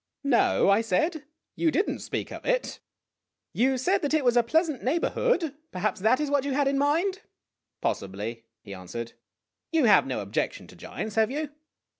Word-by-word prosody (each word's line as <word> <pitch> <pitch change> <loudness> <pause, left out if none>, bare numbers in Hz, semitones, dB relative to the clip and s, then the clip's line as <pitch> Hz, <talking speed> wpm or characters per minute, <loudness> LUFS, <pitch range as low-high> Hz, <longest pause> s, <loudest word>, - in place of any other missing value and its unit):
"No," 280 -4 +3
I 200 +2 +5
said; 300 - 0 0.3
"you 330 - +2
did 385 +6 +1
n't - - -3
speak - - -4
of - - -8
it. - - -1 0.7
You 260 +2 +2
said 360 +10 +1
that 295 +1 +1
it 300 -4 +1
was 245 -1 +4
a 240 - +6
pleasant 310 +3 0
neighborhood. 335 - +1 0.2
Perhaps 180 +1 -2
that 225 +6 +3
is 300 -1 -1
what 285 -2 +2
you 280 -1 -2
had 285 0 +2
in 275 0 +1
mind." 340 +8 +1 0.3
" - - -60
Possibly," 105 +4 -3 0.2
he 100 - -9
answered. 95 +6 -7 0.3
" - - -60
You 320 -5 +3
have 210 - +5
no - - -2
objection - - -3
to - - -15
giants, 215 - -6
have 220 0 +4
you 300 +2 -3
275 Hz, 190 wpm, -27 LUFS, 220-315 Hz, 0.7 s, a